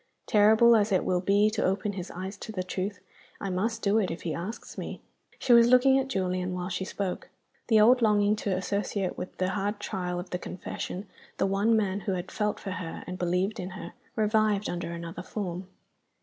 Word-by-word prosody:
Terrible 220 +3 +6
as 210 -1 +2
it 185 - +2
will 180 -1 +1
be 205 +3 +3
to 215 - -1
open 195 +2 0
his 185 -2 -6
eyes 190 +3 -6
to 220 - -7
the 185 -4 -3
truth, 185 +1 -4 0.4
I 195 - -3
must 220 +5 -1
do 205 +2 +3
it 195 - 0
if 165 - -6
he 165 - -2
asks 185 +9 -6
me." - - -6 0.4
She 245 - +3
was 235 0 +8
looking 260 +2 +6
at 270 - -2
Julian 185 -5 -1
while 180 0 -3
she 190 +1 -2
spoke. 190 -1 -4 0.4
The 220 -2 +5
old 245 +4 +6
longing 210 -1 +4
to 195 -3 -1
associate 200 0 -2
with 185 - -7
the 185 0 0
hard 205 +1 -2
trial 180 -3 -3
of 180 - -8
the 180 - -2
confession 185 +2 -6 0.3
the - - +2
one 200 +4 +3
man 200 -2 0
who 195 -1 -2
had 180 0 -4
felt 210 -1 -1
for 195 - -5
her, 175 -2 -5
and 180 0 -6
believed 180 +5 0
in 180 - -4
her, 170 +1 -8 0.2
revived 215 -1 +2
under 175 -1 -4
another 170 +1 -6
form. 180 -2 -5
195 Hz, 205 wpm, -28 LUFS, 180-215 Hz, 0.4 s, was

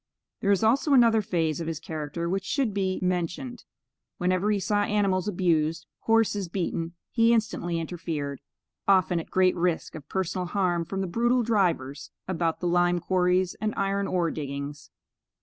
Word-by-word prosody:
There 200 - -1
is 200 +1 +3
also 270 +6 +3
another 230 -4 +5
phase 165 -5 -1
of 165 - -4
his 165 -2 -3
character 160 +1 -4
which 190 +2 -1
should 250 0 0
be 190 -2 0
mentioned. 180 +7 -2 0.5
Whenever 185 +2 +1
he 210 -1 +2
saw 205 +2 +1
animals 200 -2 +1
abused, 165 -4 +1
horses 225 -4 +2
beaten, 170 -2 -3 0.2
he 230 -1 +4
instantly 210 -6 0
interfered, 160 -4 -4 0.5
often 185 -3 +4
at 165 - -8
great 185 -1 +3
risk 175 -1 -1
of 150 -2 -10
personal 185 -1 -2
harm 175 -3 0
from 195 +3 -3
the - - -1
brutal 240 +6 +2
drivers 170 - 0 0.2
about 170 -3 -1
the 175 - 0
lime 175 0 +3
quarries 180 +1 +1
and 215 0 -1
iron 195 0 0
ore 175 -3 0
diggings. 140 0 -6
180 Hz, 160 wpm, -27 LUFS, 165-200 Hz, 0.5 s, another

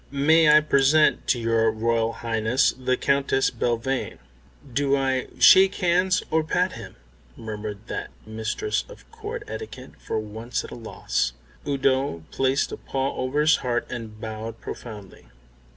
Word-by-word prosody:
May 155 +3 +4
I 150 +1 +7
present 150 +1 +3
to 125 - +2
your 115 -1 +2
Royal 115 +1 0
Highness 115 +2 +1
the 130 0 -1
Countess 140 -1 +1
Belvane." 120 +2 -2 0.6
"Do 140 +1 +2
I 130 -1 0
shake 190 +1 +7
hands 185 +1 +2
or 160 0 +2
pat 180 +3 0
him?" - - -10 0.4
murmured 105 -1 -7
that - - -5 0.2
mistress 110 - -2
of - - -14
Court 450 +1 -6
etiquette, 440 - -8
for - - -4
once 110 +3 -4
at - - -11
a - - -7
loss. 110 - -2 0.3
Udo 135 - 0
placed 135 +1 0
a - - -5
paw 135 0 -3
over 130 +4 -1
his 155 0 +4
heart 120 -2 -1
and 110 -3 -7
bowed 110 +1 -6
profoundly. 105 -5 -9
130 Hz, 145 wpm, -24 LUFS, 115-150 Hz, 0.6 s, I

